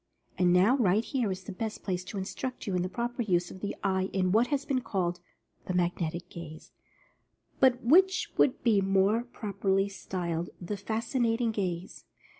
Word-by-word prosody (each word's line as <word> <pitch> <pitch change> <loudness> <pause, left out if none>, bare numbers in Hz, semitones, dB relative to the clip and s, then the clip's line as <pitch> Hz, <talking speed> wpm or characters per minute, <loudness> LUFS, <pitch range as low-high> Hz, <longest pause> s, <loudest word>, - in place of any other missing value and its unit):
And 180 -1 +3
now, 190 +9 +5
right 215 -2 +3
here 245 -7 -1
is 185 0 -5
the 205 - -7
best 215 +3 -5
place 185 -2 -2
to 200 - -6
instruct 250 +7 -4
you 195 -4 -1
in 180 - +1
the 180 - -2
proper 240 +3 -3
use 180 -5 +1
of 185 - -10
the 205 - -3
eye 190 -1 +1
in 185 -1 +1
what 225 +5 +4
has 285 -1 -1
been 265 -3 0
called 180 -6 -1 0.5
"The 185 - -1
Magnetic 175 -1 -1
Gaze," 165 -3 -10 0.9
but 255 -1 +4
which 375 +9 +4
would 255 - +2
be 215 -5 +4
more 195 +3 +3
prop 210 -5 -7
erly 195 0 +2
styled 175 -3 -3
the 185 +3 -4
"Fascinating 230 +3 0
Gaze." 185 -4 -4
195 Hz, 180 wpm, -29 LUFS, 180-235 Hz, 0.9 s, now